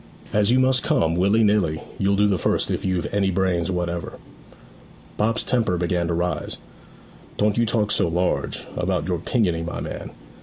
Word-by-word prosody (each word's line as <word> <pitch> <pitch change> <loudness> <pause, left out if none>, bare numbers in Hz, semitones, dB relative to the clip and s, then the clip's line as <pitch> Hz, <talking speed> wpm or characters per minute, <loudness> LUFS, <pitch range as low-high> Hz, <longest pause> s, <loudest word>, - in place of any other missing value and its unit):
As 105 0 +3
you 125 +2 +4
must 130 -1 +3
come, 80 -5 +1
willy 100 +5 +3
nilly, 100 -7 +2 0.2
you'll 100 +1 +2
do 105 +1 +3
the 100 -3 +1
first - - +1
if - - -2
you've 95 -2 0
any 100 -1 +2
brains 90 -2 0
whatever.' 85 -2 -3 1.0
Bob's 115 +3 0
temper 115 -8 +1
began 85 0 0
to 85 - -1
rise. 90 +1 -2 0.8
'Don't 105 +2 +2
you 115 - +2
talk 105 -2 +1
so - - +2
large, 90 +2 -1
about - - -1
your 90 -2 -1
pinioning, 85 -5 0
my 85 - -4
man. - - -6
95 Hz, 175 wpm, -23 LUFS, 85-105 Hz, 1.0 s, you